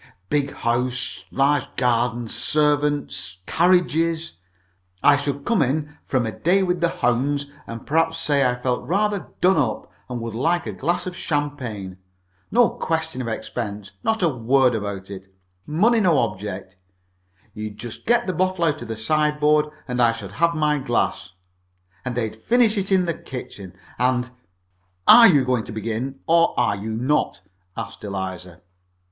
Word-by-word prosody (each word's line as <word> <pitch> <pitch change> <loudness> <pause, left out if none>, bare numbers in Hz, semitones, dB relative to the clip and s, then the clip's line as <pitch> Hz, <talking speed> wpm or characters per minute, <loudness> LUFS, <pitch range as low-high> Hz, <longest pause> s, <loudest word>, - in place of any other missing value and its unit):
Big 145 -1 0
house, 120 +1 -1
large 140 0 +2
garden, 120 -1 +1
servants, 145 -8 0
carriages. 165 -2 +2 0.7
I 145 - +7
should 140 0 -3
come 230 -4 +2
in 150 +3 -1
from 130 -3 +1
a 110 - -2
day 185 - +2
with 180 -1 -1
the 170 - +3
hounds, 140 +4 0 0.2
and 115 0 -8
perhaps 165 +2 +1
say 145 -3 +1
I 125 -1 +1
felt 125 0 -1
rather 205 +2 0
done 185 0 +4
up, 125 -8 -1 0.2
and 125 -1 -4
would 115 -1 -5
like 165 +9 0
a 110 - -4
glass 170 - -1
of 180 -1 -5
champagne. 130 - -3 0.5
No 240 +1 +4
question 160 -4 -2
of 120 - -4
expense 105 -3 -5
not 220 -4 0
a - - +5
word 130 0 +2
about 100 -3 -4
it 95 -1 -9 0.4
money 215 +10 +3
no 175 -7 +3
object. 100 -4 -3 0.8
You'd 105 -1 -6
just 120 +1 -8
get 240 +1 +3
the 185 - -1
bottle 185 0 0
out 155 -2 +1
of - - -7
the 115 -1 -5
sideboard, 150 +4 +2 0.2
and 125 -1 -1
I 115 -1 +4
should 105 -4 -8
have 170 +5 +1
my 150 -1 +1
glass, 120 -7 -1 0.7
and 125 -2 -4
they'd 110 -3 -2
finish 235 - +3
it 195 -1 -2
in 185 -2 +4
the 170 - 0
kitchen, 105 - -9 0.3
and 125 0 +1 0.4
" 90 0 -44
"Are 230 - +10
you 145 -8 +4
going 125 -3 +1
to - - -6
begin, 115 +5 -4
or 165 -4 +3
are 120 -4 +2
you 100 +3 -6
not?" 125 +2 0 0.4
asked - - -7
Eliza. 95 -3 -5
135 Hz, 160 wpm, -22 LUFS, 115-165 Hz, 0.8 s, Are